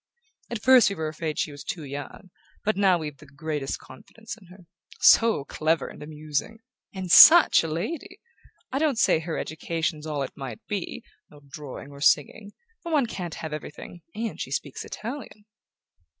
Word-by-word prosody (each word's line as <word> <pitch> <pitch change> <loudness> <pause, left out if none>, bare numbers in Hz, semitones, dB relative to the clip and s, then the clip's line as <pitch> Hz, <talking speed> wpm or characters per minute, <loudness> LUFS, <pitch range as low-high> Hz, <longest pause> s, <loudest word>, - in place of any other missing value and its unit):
At 235 -3 -5
first 255 -5 +7
we 200 - -4
were 160 -2 -3
afraid 155 0 -4
she 150 - -1
was 145 0 -10
too 180 -8 -5
young; 145 +6 -8 0.3
but 215 - +2
now 190 -2 +4
we've 150 -3 -6
the 150 - -16
greatest 145 0 -4
confidence 220 +12 -11
in 200 -6 -19
her. 180 0 -16 0.3
So 225 -11 +5
clever 160 +2 0
and - - -12
amusing 150 +7 -4 0.3
and 190 -3 -5
SUCH 330 - +9
a - - -3
lady! 335 - -5 0.5
I 270 - -1
don't 300 -5 +1
say 190 - +3
her 160 0 -4
education's 160 -1 -3
all 145 -2 -2
it 135 - -7
might 130 -6 -8
be... 200 -4 -4 0.3
no 145 - -17
drawing 140 -1 -9
or 140 0 -12
singing... 175 +8 +2 0.3
but 335 -2 -4
one 285 -4 +3
can't 180 -7 -6
have 160 -2 -6
everything; 155 +3 -8
and 225 +1 -4
she - - -4
speaks - - -4
Italian..." 230 -3 -8
165 Hz, 175 wpm, -26 LUFS, 150-220 Hz, 0.5 s, SUCH